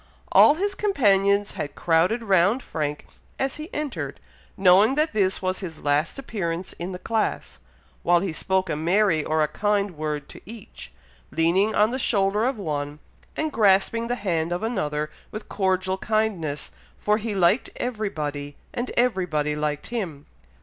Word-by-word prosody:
All 295 Hz, -, +7 dB
his 400 Hz, +4 st, -1 dB
companions 205 Hz, -, +2 dB
had 145 Hz, -, -5 dB
crowded 175 Hz, +8 st, +2 dB
round 200 Hz, +4 st, +3 dB
Frank 150 Hz, -2 st, -3 dB, 0.3 s
as 270 Hz, 0 st, -2 dB
he 310 Hz, +5 st, -8 dB
entered, 175 Hz, -, -4 dB, 0.4 s
knowing 195 Hz, +6 st, +5 dB
that 305 Hz, -1 st, +1 dB
this 195 Hz, -3 st, +1 dB
was 185 Hz, 0 st, -1 dB
his 165 Hz, -5 st, -7 dB
last 145 Hz, -, 0 dB
appearance 185 Hz, -9 st, -4 dB
in 175 Hz, +2 st, -4 dB
the 180 Hz, -, -5 dB
class; 180 Hz, -, -2 dB, 0.4 s
while 175 Hz, 0 st, +4 dB
he 180 Hz, -2 st, -3 dB
spoke 190 Hz, +4 st, 0 dB
a 165 Hz, -, -1 dB
merry 170 Hz, +1 st, +2 dB
or 155 Hz, +1 st, 0 dB
a -, -, +1 dB
kind 205 Hz, +4 st, 0 dB
word 150 Hz, -1 st, -3 dB
to -, -, -12 dB
each, 220 Hz, 0 st, -11 dB, 0.4 s
leaning 170 Hz, +8 st, +2 dB
on 215 Hz, +2 st, +4 dB
the 260 Hz, -, -2 dB
shoulder 210 Hz, -2 st, +2 dB
of 260 Hz, -1 st, 0 dB
one, 150 Hz, -6 st, -3 dB, 0.4 s
and 310 Hz, 0 st, -1 dB
grasping 220 Hz, +1 st, +3 dB
the 245 Hz, -, 0 dB
hand 170 Hz, -7 st, -1 dB
of 175 Hz, +4 st, -2 dB
another 150 Hz, -9 st, -2 dB, 0.2 s
with 215 Hz, 0 st, -8 dB
cordial 190 Hz, -1 st, 0 dB
kindness, 195 Hz, -10 st, -1 dB, 0.3 s
for 210 Hz, +1 st, +1 dB
he 215 Hz, -1 st, -3 dB
liked 190 Hz, +6 st, +3 dB
everybody, 150 Hz, -, -3 dB, 0.2 s
and 240 Hz, +1 st, -3 dB
everybody 180 Hz, -11 st, +1 dB
liked 150 Hz, -1 st, -2 dB
him. 165 Hz, -11 st, -4 dB
190 Hz, 155 wpm, -24 LUFS, 160-220 Hz, 0.4 s, All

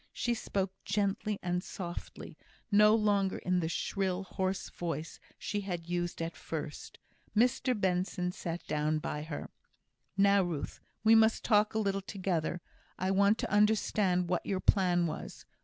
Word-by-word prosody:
She 240 Hz, -, 0 dB
spoke 195 Hz, -4 st, -2 dB
gently 200 Hz, +1 st, 0 dB
and 180 Hz, 0 st, -1 dB
softly; 175 Hz, -2 st, -7 dB, 0.4 s
no 210 Hz, +1 st, +7 dB
longer 205 Hz, -3 st, +2 dB
in 180 Hz, -1 st, 0 dB
the 160 Hz, -2 st, -1 dB
shrill, 190 Hz, +2 st, -1 dB
hoarse 190 Hz, 0 st, -2 dB
voice 165 Hz, -2 st, -4 dB, 0.2 s
she 205 Hz, -, -3 dB
had 175 Hz, -4 st, -4 dB
used 175 Hz, -1 st, -2 dB
at 165 Hz, 0 st, -4 dB
first. 155 Hz, -2 st, -6 dB, 0.4 s
Mr 250 Hz, 0 st, +2 dB
Benson 180 Hz, -1 st, 0 dB
sat 170 Hz, -1 st, -5 dB
down 155 Hz, +1 st, 0 dB
by 150 Hz, -1 st, -3 dB
her. 150 Hz, -1 st, -6 dB, 0.7 s
"Now, 200 Hz, 0 st, +5 dB
Ruth, 170 Hz, -6 st, -3 dB, 0.2 s
we 220 Hz, 0 st, +6 dB
must 220 Hz, 0 st, +5 dB
talk 210 Hz, -1 st, +3 dB
a -, -, +2 dB
little 195 Hz, -2 st, 0 dB
together. 180 Hz, -4 st, -2 dB, 0.4 s
I 185 Hz, +1 st, 0 dB
want 200 Hz, +2 st, +4 dB
to -, -, -3 dB
understand 210 Hz, -3 st, +3 dB
what 180 Hz, 0 st, 0 dB
your 190 Hz, -, -1 dB
plan 180 Hz, -3 st, +3 dB
was. 155 Hz, -1 st, -6 dB
190 Hz, 150 wpm, -31 LUFS, 175-205 Hz, 0.7 s, no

